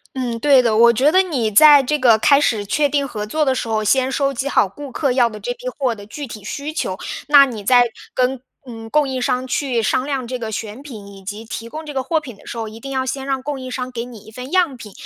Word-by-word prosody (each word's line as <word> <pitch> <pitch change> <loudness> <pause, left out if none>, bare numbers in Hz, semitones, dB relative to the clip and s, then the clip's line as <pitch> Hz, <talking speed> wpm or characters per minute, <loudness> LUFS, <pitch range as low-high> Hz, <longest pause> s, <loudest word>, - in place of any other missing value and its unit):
嗯， 245 -3 -3
对 275 +1 +5
的。 225 -2 +1
我 235 +2 +6
觉 265 +6 +2
得 375 +3 +5
你 270 - -1
在 290 +5 +7
这 300 +3 -1
个 235 -4 +5
开 280 +6 +4
始 220 -7 0
确 290 +8 +1
定 280 0 0
合 210 -4 -5
作 305 +7 0
的 265 - +2
时 250 - -3
候， 220 -1 -1
先 260 +5 +2
收 275 0 0
集 275 +2 -3
好 205 - +3
顾 280 +8 -10
客 275 +2 0
要 245 -2 +3
的 215 -1 -9
这 - - -4
批 - - -6
货 260 -4 0
的 205 -2 -11
具 290 +7 -7
体 215 -5 -10
需 285 +8 -5
求。 190 - -3 0.3
那 285 -1 +8
你 230 -6 -7
在 245 +2 +4 0.2
跟 255 0 0 0.3
嗯， 225 -2 -9
供 300 +2 +2
应 260 -1 -3
商 250 +1 -1
去 255 -2 -1
商 255 +4 0
量 270 -4 -3
这 255 +1 -4
个 225 -2 -5
选 220 +3 -6
品， 220 -9 -10
以 195 -1 -13
及 210 +3 -7
提 225 +1 -7
供 315 +5 -8
这 295 - -7
个 265 - -2
货 320 +5 0
品 265 -7 -10
的 - - -20
时 - - -7
候， 225 -1 -4
一 215 +1 -10
定 275 +4 -8
要 260 -1 -1
先 265 +1 -4
让 270 -1 -2
供 280 0 -4
应 255 0 -7
商 255 0 -4
给 235 -2 -5
你 240 -3 -11
一 220 - -15
份 250 +4 -9
样 355 -7 +2
品。 215 -3 -11
255 Hz, 300 characters per minute, -19 LUFS, 225-280 Hz, 0.3 s, 那